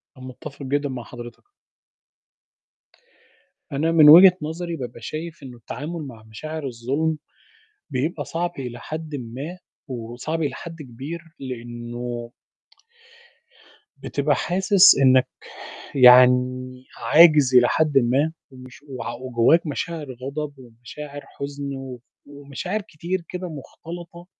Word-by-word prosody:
ومتفّق 130 +2 -10
جدًا 145 +1 -1
مع 125 -2 -5
حضرتك. 120 +1 -11 2.3
أنا 150 +4 0
من 155 -3 +7
وجهة 180 +3 +10
نظري 165 +3 -4
بابقى 120 -5 -7
شايف 155 +4 -6
إنه 125 -2 -10
التعامل 150 +7 -6
مع 115 -4 -12
مشاعر 155 +8 -7
الظُلم 135 +7 -1 0.7
بيبقى 145 +5 -2
صعب 175 +1 -2
إلى 120 -2 -6
حدٍ 155 -1 -6
ما، 135 +8 -6 0.3
وصعب 125 +6 -5
إلى 145 - -2
حد 165 -2 -9
كبير 140 +6 -7 0.2
لأنه 120 -1 -6 1.7
بتبقى - - 0
حاسس 190 +2 +5
إنك 130 -1 +5 0.7
يعني 125 0 +5
عاجز 150 -5 +6
إلى 125 -1 +7
حدٍ 150 -3 +3
ما 135 +6 +1 0.2
ومش 130 0 -14
وع 130 -4 -5
وجواك 130 +7 +2
مشاعر 155 +1 -4
غضب، 140 +4 -5
ومشاعر 130 +4 -10
حزن، 140 0 -6 0.6
ومشاعر 145 +8 -5
كتير 175 -1 -5
كده 180 0 -5
مختلطة، 170 +3 -10
140 Hz, 110 wpm, -23 LUFS, 125-160 Hz, 2.3 s, وجهة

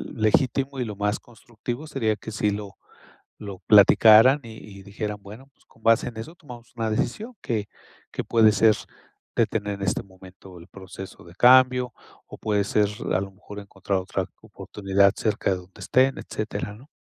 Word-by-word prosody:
legítimo 130 +5 +1
y 125 - -1
lo 105 -2 -6
más 105 +1 -1
constructivo, 120 +3 -8
sería 115 -7 -1
que 110 - -9
sí 105 -1 0
lo 100 -1 -6 0.6
lo 100 -3 -8
platicaran 110 +5 +7
y 115 -1 -10 0.2
y - - -13
dijeran 105 +1 -5
bueno, 110 +7 -12
pues, - - -31
con 115 - -26
base 115 +1 +3
en 115 - -13
eso, 115 +10 -8
tomamos 120 -8 -13
una 115 -1 -2
decisión, 215 - -3
que 110 -3 -3 0.4
que - - -4
puede 110 -2 +4
ser 110 +1 +4 0.6
detener 105 -2 0
en 100 - -7
este 95 - -1
momento 95 -1 -15
el 85 - -15
proceso 95 0 -11
de 85 - -14
cambio, 125 +1 +5 0.3
o - - -11
puede 105 -2 0
ser 105 0 +1 0.2
a 95 - +2
lo 100 0 -6
mejor 105 +1 -11
encontrar 100 -1 -3
otra 95 0 -3 0.2
oportunidad 100 0 0
cerca 105 -2 -1
de - - +1
donde 90 +1 -15
estén, 130 +1 +2
etcétera, 105 -1 -5
¿no? 125 +6 -17
105 Hz, 175 wpm, -24 LUFS, 100-120 Hz, 0.6 s, platicaran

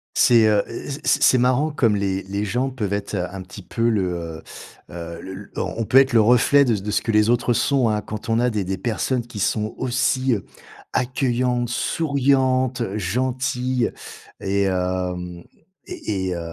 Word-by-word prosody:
C'est, 115 -2 +5
heu 105 -2 +3
heu, 115 - -7
c'est - - +2
c'est 130 - +6
marrant 130 +5 +2
comme 115 -8 +2
les 95 -1 -1
les 100 +2 -3
gens 125 +6 -1
peuvent 105 -6 -3
être 105 +1 -3
un 90 0 -4
petit 95 +2 -11
peu 115 +6 0
le, 105 -4 +1
heu 85 -3 -5 0.5
heu, 85 0 -7
le 95 - -8
l 100 +2 -10
on - - -3
on 115 - 0
peut 130 - +3
être 135 -1 +5
le 115 - +6
reflet 125 +5 +5
de 120 -3 +2
c 100 - -4
de 105 - -3
ce - - +1
que 115 - -2
les 105 +2 +4
autres 120 0 +2
sont, 130 -1 +2
hein. 105 -1 0
Quand 110 +3 -7
on 115 - +2
a 125 0 +2
des 105 -3 -1
des 95 +1 -3
personnes 120 +4 -1
qui 120 -3 -9
sont 105 +2 0
aussi, 130 0 +1
heu, 100 - -6 0.5
accueillantes, 125 -1 0
souriantes, 130 -3 +1
gentilles 125 +4 -1 0.5
et 100 +1 0
hem 90 -2 -2 0.4
et 95 -3 -3
et 90 - -2
heu, - - -4
115 Hz, 190 wpm, -22 LUFS, 95-125 Hz, 0.5 s, c'est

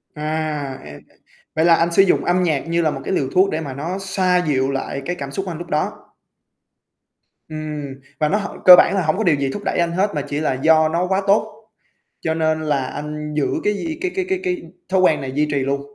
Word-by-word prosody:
À, 150 -3 -3
e 75 -1 -10 0.6
vậy 160 +1 +2
là 170 - +6
anh 170 +1 +1
sử 170 - +5
dụng 195 - +2
âm 180 +1 +2
nhạc 155 -4 0
như 170 +1 +1
là 155 - +1
một 135 - -6
cái 190 - -3
liều 135 -6 0
thuốc 190 +2 +5
để 160 -2 -2
mà 140 -4 -6
nó 165 +8 -4
xoa 190 -1 +1
dịu 135 -1 +1
lại 135 0 -4
cái 175 - -2
cảm 140 -4 -6
xúc 190 +6 -4
anh 170 - -4
lúc 175 +1 -8
đó. 150 -1 0 1.6
Ừm. 155 -1 -5 0.3
Và 150 -1 +2
nó 200 - +2
h 205 - -3 0.2
cơ 180 - +12
bản - - +4
là 195 - +1
hổng 155 +3 +1
có 220 - 0
điều 170 -7 +4
gì 140 -1 -1
thúc 205 - -6
đẩy - - -1
anh 170 -1 +1
hết 190 +4 0
mà 145 - 0
chỉ 145 +1 -4
là 155 -3 0
do 155 +4 +3
nó 170 +3 0
quá 190 +1 +1
tốt, 210 +2 +2 0.7
cho 160 - -1
nên 160 -1 0
là 145 -3 0
anh 150 +2 -6
giữ 150 - +2 0.2
cái 210 - +2
gì 315 +10 -4
cái 370 -1 -1
cái 380 -1 -1
cái 380 -1 0
cái 360 -3 -2 0.3
thói 190 0 +2
quen 170 -4 +3
này 135 -1 -5
duy 150 +3 0
trì 145 - 0
luôn. 140 +1 -1
160 Hz, 250 wpm, -20 LUFS, 150-185 Hz, 1.6 s, cơ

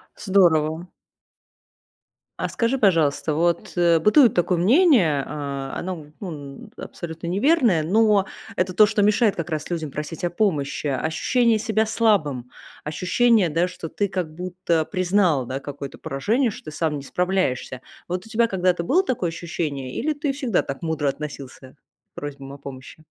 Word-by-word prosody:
Здорово. 175 -4 +2 1.5
А - - -1
скажи, 240 +3 0
пожалуйста, 165 - +2
вот, 170 +1 0
э, 170 -2 +4
бытует 230 - +5
такое 175 0 +1
мнение, 195 - +4
а, 140 -2 -5
оно, 175 -5 -5
ну, 145 -7 -8
абсолютно 165 0 -7
неверное, 220 - +3
но 210 +3 +3 0.3
это 185 0 0
то, 215 +3 +7
что 210 0 0
мешает 210 0 +3
как 170 0 -4
раз 155 0 -3
людям 160 -5 -3
просить 150 +4 -6
о 175 - +1
помощи. 155 -7 -1
Ощущение 215 - +1
себя 220 0 +1
слабым, 160 - +1 0.3
ощущение, 185 +5 +2
да, 165 +4 +1
что 170 -3 -8
ты 205 - -1
как 180 -5 -4
будто 175 -2 -1
признал, 185 -7 +1
да, 130 +3 -4
какое-то 140 -1 -8
поражение, 225 - 0
что 205 - -10
ты 155 - -7
сам 155 -3 0
не 140 - -8
справляешься. 180 -8 -1 0.3
Вот 180 +2 -4
у - - -14
тебя 230 +1 +2
когда-то 180 -3 0
было 370 - +3
такое 230 - -1
ощущение 155 -6 -4
или 310 +4 -1
ты 290 -1 -2
всегда 255 - 0
так 135 - -6
мудро 160 -4 -1
относился 140 -2 -8 0.4
к - - -64
просьбам 140 -1 -7
о - - -9
помощи? 135 +3 -11
175 Hz, 155 wpm, -23 LUFS, 150-205 Hz, 1.5 s, то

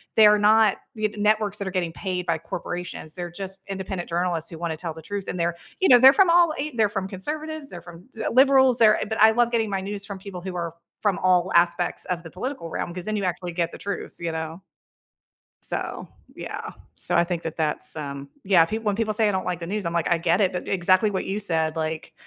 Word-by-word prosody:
they're 210 -1 +7
not 215 0 +4 0.2
y 215 -1 0
networks 210 0 +1
that 200 -2 -2
are - - -3
getting 175 -3 -2
paid 180 -2 -4
by 165 -1 +1
corporations, 165 0 -6
they're 175 -1 -5
just 195 +2 -6
independent 190 -2 -4
journalists 170 -1 0
who 165 - -8
wanna 165 -2 -3
tell 165 0 -5
the 160 - -10
truth, 200 +4 -5
and 180 - -4
they're 170 0 0 0.2
you 380 - +3
know, 250 - +9
they're 265 +2 +9
from 375 +4 +5
all 340 -2 +5
eight 295 0 -3
they're 215 -2 +3
from 195 -2 -3
conservatives, 300 +9 -5
they're 175 - -8
from 175 +1 -13
d 220 - -6
liberals, 265 -1 +5
they're, 215 -3 +6
uh - - -2
but 220 - -2
I 220 +1 +8
love 235 +1 +2
getting 225 -2 +1
my 195 -1 -1
news 200 +1 -3
from 195 -1 -6
people 190 -2 -8
who 185 0 -6
are 170 -2 -4 0.3
from 205 -4 +1
all 185 0 +3
aspects 170 +1 +2
of 180 -2 -2
the 165 - -9
political 190 - -5
realm, 170 - -4
'cause 180 0 -5
then 215 - -2
you 200 - -2
actually 180 0 -3
get 170 -1 -1
the - - -9
truth, 200 -1 -5
you 170 -1 -2
know? 160 +2 -5 1.0
So, - - -4 0.3
yeah. - - -6 0.2
So, 175 - -2
I 170 - +5
think 170 -1 -3
that 160 - -5
that's, 155 -2 -1
um, 140 -2 -6
yeah, 185 -4 +5
pe 215 +5 -3
when 210 -3 -1
people 215 0 -1
say, 220 0 +2
"I - - +2
don't 190 -2 -2
like 180 -2 -2
the 170 - -6
news," 205 +1 -2
I'm 170 - -2
like, 170 -2 0
"I 170 - +3
get 170 +3 +1
it," 190 -2 +2
but 180 - -4
exactly 185 +3 +3
what 190 - -2
you 200 +2 -2
said, 160 -5 0
like, 160 0 -4
185 Hz, 245 wpm, -24 LUFS, 170-215 Hz, 1.0 s, know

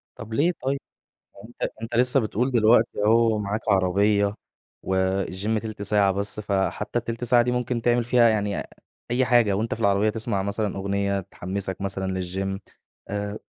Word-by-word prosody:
طَب 115 -2 -9
ليه 165 +8 +3
طيب؟ 135 +1 0 0.6
ما - - -14
هو 105 - -11
أنتَ 120 - -4
أنتَ 115 +1 -5
لسه 125 +2 +3
بتقول 120 +3 -1
دلوقتي 115 -2 +3
أهو 115 0 +4
معاك 105 +1 -2
عربية 100 +2 +2 0.5
والGYM 95 +3 0
تِلت 110 -2 -6
ساعة 100 -1 +3
بس، 100 +2 -3
فحتى 100 +3 -1
التِلت 115 0 -4
ساعة 120 0 +5
دي 125 - -1
ممكن 125 -1 -1
تعمل 120 0 +2
فيها 120 -1 +4
يعني 105 -2 0 0.5
أي 125 +2 +2
حاجة 120 -5 +4
وأنتَ 110 +4 -1
في - - -11
العربية 100 0 +3
تسمع 110 -2 -2
مثلًا 100 0 -2
أغنية 100 0 -1
تحمسك 95 +1 -5
مثلًا 95 -1 -2
للGYM 95 +2 -3 0.5
آآ 105 +1 -3
105 Hz, 165 wpm, -24 LUFS, 100-115 Hz, 0.6 s, ساعة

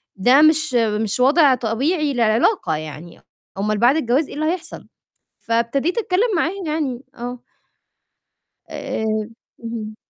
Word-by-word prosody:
ده 250 +9 +5
مش 310 -3 +3
مش 220 -1 0
وَضع 275 +1 +5
طبيعي 275 +7 -1
للعلاقة 230 - +1
يعني، 155 +2 -9 0.4
أومال 210 +1 -1
بعد 240 +6 +4
الجواز 270 +2 +1
إيه - - -9
اللي 310 +1 -2
هيحصل؟! 345 -1 -7 0.5
فابتديت 235 - -1
أتكلّم 425 0 +1
معاه 330 +2 +1
يعني، 285 -5 -2
آه. 245 +1 -6 1.3
آآ، 220 - -4 0.6
اهم. 220 -2 -6
250 Hz, 120 wpm, -20 LUFS, 225-310 Hz, 1.3 s, ده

